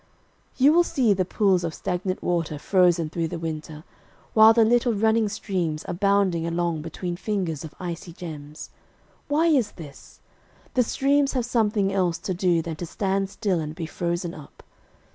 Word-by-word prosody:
You 275 Hz, +3 st, +5 dB
will 345 Hz, +1 st, +5 dB
see 260 Hz, -11 st, +2 dB
the 185 Hz, -1 st, 0 dB
pools 190 Hz, -1 st, +2 dB
of 165 Hz, -1 st, -3 dB
stagnant 185 Hz, +1 st, -3 dB
water 165 Hz, -4 st, -1 dB
frozen 175 Hz, -1 st, +2 dB
through 165 Hz, -1 st, -1 dB
the 170 Hz, -, -5 dB
winter, 155 Hz, -1 st, -6 dB, 0.5 s
while 220 Hz, 0 st, +8 dB
the 225 Hz, 0 st, +4 dB
little 240 Hz, +1 st, +3 dB
running 220 Hz, +1 st, +2 dB
streams 180 Hz, -7 st, -3 dB
are -, -, -4 dB
bounding 195 Hz, -3 st, +1 dB
along 170 Hz, -1 st, -1 dB
between 175 Hz, +2 st, -5 dB
fringes 180 Hz, -6 st, -3 dB
of 155 Hz, -, -9 dB
icy 175 Hz, -1 st, -6 dB
gems. 155 Hz, -3 st, -9 dB, 0.6 s
Why 300 Hz, +3 st, +2 dB
is 275 Hz, -10 st, +2 dB
this? 150 Hz, -5 st, -13 dB, 0.5 s
The 255 Hz, -, +3 dB
streams 275 Hz, +3 st, +1 dB
have 250 Hz, -3 st, 0 dB
something 210 Hz, -5 st, +1 dB
else 180 Hz, -4 st, +1 dB
to 190 Hz, -, -4 dB
do 175 Hz, -2 st, +1 dB
than 160 Hz, -1 st, -5 dB
to 175 Hz, -, -5 dB
stand 195 Hz, +2 st, -1 dB
still 195 Hz, -4 st, -1 dB
and 155 Hz, 0 st, -5 dB
be 165 Hz, -1 st, -4 dB
frozen 170 Hz, +1 st, -3 dB
up. 150 Hz, -, -13 dB
180 Hz, 170 wpm, -24 LUFS, 165-215 Hz, 0.6 s, while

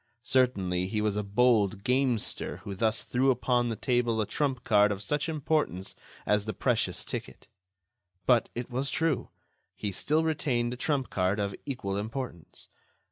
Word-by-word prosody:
Certainly, 95 Hz, -9 st, +1 dB
he 105 Hz, +2 st, -1 dB
was 105 Hz, -1 st, 0 dB
a 105 Hz, -, 0 dB
bold 105 Hz, -1 st, +2 dB
gamester 125 Hz, -2 st, 0 dB
who 100 Hz, -, -5 dB
thus 110 Hz, +3 st, +1 dB
threw 130 Hz, +2 st, +1 dB
upon 125 Hz, -1 st, +2 dB
the 115 Hz, -, -2 dB
table 120 Hz, -1 st, +1 dB
a 110 Hz, -, +2 dB
trump 135 Hz, +1 st, -1 dB
card 105 Hz, -3 st, +4 dB
of 100 Hz, -, -2 dB
such 150 Hz, +8 st, -1 dB
importance 150 Hz, -, -1 dB, 0.3 s
as 105 Hz, -1 st, +2 dB
the 110 Hz, -3 st, -4 dB
precious -, -, 0 dB
ticket. -, -, -6 dB, 0.8 s
But, 120 Hz, -2 st, +4 dB
it 120 Hz, +1 st, -5 dB
was 130 Hz, +3 st, -1 dB
true, 160 Hz, +2 st, 0 dB, 0.5 s
he 105 Hz, -, -3 dB
still 155 Hz, -, +1 dB
retained 125 Hz, -7 st, 0 dB
a -, -, -4 dB
trump 135 Hz, 0 st, -1 dB
card 95 Hz, +2 st, +1 dB
of 100 Hz, -1 st, -1 dB
equal 100 Hz, -8 st, -3 dB
importance. 110 Hz, -, -6 dB
120 Hz, 160 wpm, -29 LUFS, 105-130 Hz, 0.8 s, card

